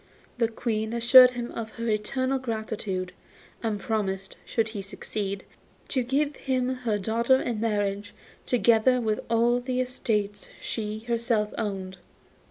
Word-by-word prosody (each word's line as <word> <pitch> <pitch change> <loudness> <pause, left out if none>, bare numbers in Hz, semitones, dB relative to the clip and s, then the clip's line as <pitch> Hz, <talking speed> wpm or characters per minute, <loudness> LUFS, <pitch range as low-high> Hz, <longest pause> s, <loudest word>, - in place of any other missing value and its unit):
The 230 - +4
Queen 225 -1 -2
assured 250 +2 +8
him 245 -1 -5
of 220 -1 -6
her 230 0 -4
eternal 260 +5 0
gratitude, 220 -6 -3 0.5
and 220 -3 -1
promised, 195 -2 -2
should 225 -1 0
he 215 -2 -5
succeed, 200 0 -4 0.5
to 260 - +1
give 280 +4 0
him 255 -2 0
her 245 -5 -1
daughter 230 +6 +2
in 235 -4 -2
marriage, 205 -2 -1 0.4
together 245 +1 +4
with 215 -3 0
all 235 +1 +3
the 250 0 -2
estates 215 -5 -1
she 215 -1 -4
herself 230 -2 0
owned. 190 -3 -3
225 Hz, 135 wpm, -27 LUFS, 210-245 Hz, 0.5 s, assured